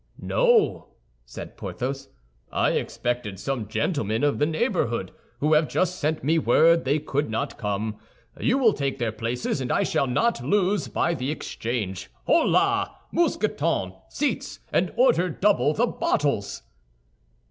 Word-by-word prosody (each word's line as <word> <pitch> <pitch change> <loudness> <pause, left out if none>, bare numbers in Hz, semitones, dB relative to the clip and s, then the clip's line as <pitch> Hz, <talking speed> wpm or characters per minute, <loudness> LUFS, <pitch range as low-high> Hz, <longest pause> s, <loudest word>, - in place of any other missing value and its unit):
"No," 485 -4 +2 0.4
said - - -9
Porthos, 135 +2 -4 0.4
"I - - +2
expected 120 -6 -2
some 120 -3 -3
gentlemen 110 - -1
of 145 -1 +2
the 150 - +3
neighborhood, 155 - -1 0.3
who 150 +2 +3
have 155 0 +4
just 185 0 0
sent 155 +1 -1
me 160 +4 +3
word 165 +6 +4
they 140 +3 +2
could 145 -2 -2
not 110 - -3
come. 105 +1 -2 0.4
You 250 - +2
will 235 -6 +4
take 140 -1 -2
their 115 -2 -1
places 115 +4 -2
and 125 - -2
I - - +2
shall 140 - +1
not 230 - +1
lose 205 0 +1
by 170 - 0
the 130 -4 -3
exchange. 115 - -4 0.2
Holà, - - +3 0.2
Mousqueton, 95 0 0 0.2
seats, 290 0 -2
and - - +2
order - - +3
double 190 -2 +2
the 235 - +3
bottles!" 140 - -1
140 Hz, 140 wpm, -25 LUFS, 115-180 Hz, 0.4 s, have